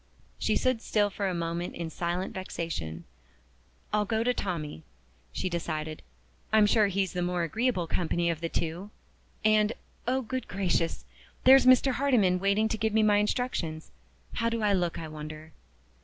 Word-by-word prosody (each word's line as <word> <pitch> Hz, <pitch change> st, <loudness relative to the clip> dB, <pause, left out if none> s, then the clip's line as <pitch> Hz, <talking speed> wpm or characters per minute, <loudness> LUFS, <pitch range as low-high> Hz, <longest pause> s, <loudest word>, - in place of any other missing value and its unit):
She -, -, +1 dB
stood 255 Hz, -3 st, +1 dB
still 205 Hz, -3 st, +1 dB
for 200 Hz, +1 st, -2 dB
a 185 Hz, -, -1 dB
moment 170 Hz, +1 st, -3 dB
in 165 Hz, -1 st, -5 dB
silent 175 Hz, +4 st, -2 dB
vexation. 165 Hz, -, -5 dB, 0.9 s
"I'll 210 Hz, 0 st, +3 dB
go 220 Hz, +2 st, 0 dB
to 250 Hz, +1 st, +2 dB
Tommie!" 165 Hz, -, -4 dB, 0.5 s
she 185 Hz, -, -2 dB
decided. 155 Hz, -3 st, -3 dB, 0.5 s
"I'm 215 Hz, -1 st, +6 dB
sure 210 Hz, 0 st, +4 dB
he's 195 Hz, -1 st, -1 dB
the 180 Hz, -, -2 dB
more 175 Hz, 0 st, 0 dB
agreeable 220 Hz, +1 st, 0 dB
company 170 Hz, +1 st, 0 dB
of 165 Hz, -1 st, -5 dB
the 165 Hz, -, -2 dB
two. 170 Hz, +5 st, -3 dB, 0.6 s
And 215 Hz, 0 st, +4 dB, 0.3 s
oh, 260 Hz, +1 st, +1 dB
good 260 Hz, +3 st, -4 dB
gracious! 180 Hz, -4 st, -1 dB, 0.4 s
there's 265 Hz, -1 st, +7 dB
Mr. 255 Hz, +1 st, +6 dB
Hardyman 240 Hz, -9 st, +2 dB
waiting 200 Hz, +3 st, +2 dB
to 220 Hz, -, -2 dB
give 220 Hz, -1 st, 0 dB
me 220 Hz, 0 st, +4 dB
my 210 Hz, -1 st, +4 dB
instructions! 205 Hz, -7 st, -1 dB, 0.4 s
How 230 Hz, 0 st, 0 dB
do 230 Hz, -1 st, -2 dB
I 205 Hz, -1 st, +3 dB
look, 175 Hz, -3 st, 0 dB
I 160 Hz, -, -5 dB
wonder?" 155 Hz, 0 st, -8 dB
190 Hz, 165 wpm, -28 LUFS, 170-220 Hz, 0.9 s, there's